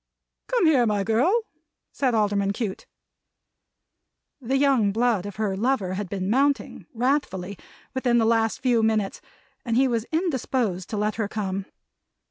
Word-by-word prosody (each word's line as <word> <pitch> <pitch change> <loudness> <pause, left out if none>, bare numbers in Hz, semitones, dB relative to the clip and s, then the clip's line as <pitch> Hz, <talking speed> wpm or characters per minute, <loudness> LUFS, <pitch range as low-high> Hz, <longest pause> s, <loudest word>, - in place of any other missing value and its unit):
"Come - - +2
here, 270 -7 +4
my 205 -2 +1
girl!" 290 - +2 0.5
said 255 -4 0
Alderman 200 -2 +1
Cute. 205 -3 -4 1.5
The 265 +2 0
young 270 -7 +3
blood 220 -3 +1
of 205 - -8
her 210 -2 -1
lover 210 -3 0
had 195 -1 -4
been 190 -1 -3
mounting, 275 +6 0
wrathfully, 235 -7 -1 0.4
within 250 -2 +1
the 225 - +3
last 225 -1 +1
few 245 -3 +3
minutes; 220 -3 0 0.4
and 230 -1 0
he 265 +1 +4
was 230 -3 -1
indisposed 260 - -1
to 215 - -3
let 210 +1 -1
her 220 -3 -1
come. 195 -2 -3
225 Hz, 145 wpm, -24 LUFS, 200-260 Hz, 1.5 s, here